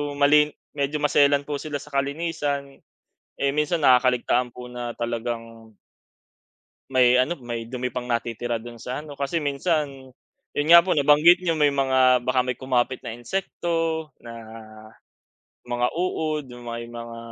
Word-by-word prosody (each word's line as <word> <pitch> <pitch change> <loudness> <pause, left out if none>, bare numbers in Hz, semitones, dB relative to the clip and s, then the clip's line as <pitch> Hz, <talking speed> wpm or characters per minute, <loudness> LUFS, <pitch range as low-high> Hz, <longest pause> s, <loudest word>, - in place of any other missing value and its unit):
malin 150 +1 +5 0.2
medyo 145 +1 -1
maselan 145 -1 +4
po 145 -1 -4
sila 150 -2 -4
sa 150 +2 -13
kalinisan, 140 -1 -2 0.6
eh, 140 - +1
minsan 150 +3 0
nakakaligtaan 125 -2 +3
po 125 - -9
na 120 -1 -5
talagang 115 -1 -5 1.2
may 125 -1 +4
ano, 150 +7 +1
may 120 -1 -5
dumi 125 +1 -4
pang 125 -1 -5
natitira 120 0 -2
do'n 120 +1 -8
sa 125 +5 -5
ano 145 -2 -11
kasi 145 +3 -1
minsan 140 -2 -1 0.5
yun 145 +1 0
nga 170 - +11
po 180 +2 0
nabanggit 150 +5 +5
niyo 175 - +1
may 150 - +5
mga 130 -3 +3
baka 130 +1 +1
may 125 - -1
kumapit 130 -1 -1
na - - -5
insekto 165 +4 -2 0.2
na, 120 - -9 1.3
mga 120 0 0
uod 160 -4 -1
yung 120 -1 -10
may 115 0 -5
mga 115 0 -8
135 Hz, 145 wpm, -24 LUFS, 120-150 Hz, 1.3 s, nga